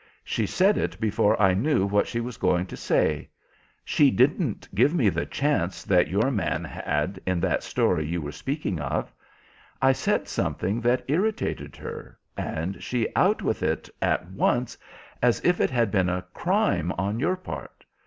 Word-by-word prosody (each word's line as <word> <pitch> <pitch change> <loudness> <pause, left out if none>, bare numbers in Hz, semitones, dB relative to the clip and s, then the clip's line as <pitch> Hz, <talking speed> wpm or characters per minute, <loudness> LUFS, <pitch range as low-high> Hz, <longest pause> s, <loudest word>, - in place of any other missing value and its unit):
She - - -1
said 195 +2 +3
it - - -3
before 105 -2 +2
I 95 -3 +5
knew 110 +1 +2
what 100 +1 +2
she 120 - -2
was 120 0 -5
going 90 0 +1
to - - -8
say. 75 -2 0 0.6
She 145 - +4
didn't 135 - +1
give 125 - +3
me - - +4
the - - -2
chance 135 - -1
that 90 -4 +3
your 105 - +1
man 105 -6 -1
had 75 +6 -2
in 95 -2 0
that - - +1
story 80 -4 0
you 85 +2 -2
were 75 -2 -5
speaking 100 - -3
of. 75 - -3 0.7
I 135 - +5
said 130 - 0
something 105 +6 -1
that 120 +2 +1
irritated 195 +10 -1
her - - -8 0.2
and 85 +5 -4
she 120 -3 -1
out - - +3
with - - -1
it - - -1
at - - +1
once 120 +5 0 0.5
as 120 -1 +3
if 180 0 +3
it - - +3
had 120 -5 +1
been 95 -3 +2
a 90 0 -2
crime 85 +3 +1
on 100 +5 -2
your 180 +8 +1
part. 185 - -9
105 Hz, 175 wpm, -26 LUFS, 90-135 Hz, 0.7 s, I